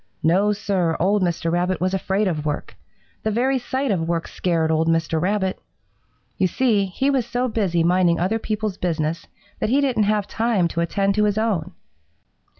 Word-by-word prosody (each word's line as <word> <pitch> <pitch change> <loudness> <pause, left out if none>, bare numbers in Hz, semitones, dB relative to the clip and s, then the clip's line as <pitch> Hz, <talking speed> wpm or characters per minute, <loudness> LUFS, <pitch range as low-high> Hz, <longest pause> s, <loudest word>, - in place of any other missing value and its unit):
No, 190 +6 +3
Sir, 190 -5 0
old 200 +4 +2
Mr. 170 -2 0
Rabbit 180 +2 0
was 185 +1 0
afraid 195 +2 0
of 155 -5 -2
work. 150 -1 -4 0.5
The 220 - -1
very 255 +5 +1
sight 260 +1 -2
of 165 -4 -1
work 165 -1 -1
scared 165 -3 0
old 160 +1 +1
Mr. 165 -1 +1
Rabbit. 190 0 0 0.8
You 185 - +3
see, 215 0 +1
he 265 +10 0
was 265 -3 +1
so 245 +2 -1
busy 190 -8 0
minding 175 -1 +3
other 195 +6 0
people's 215 -3 -3
business 165 -2 -2 0.3
that - - 0
he 270 +4 +3
didn't 255 -7 +2
have 210 -2 0
time 220 -6 +1
to 170 - -2
attend 195 +4 +1
to 210 +1 +2
his 205 0 0
own. 195 -6 -1
190 Hz, 180 wpm, -22 LUFS, 170-215 Hz, 0.8 s, No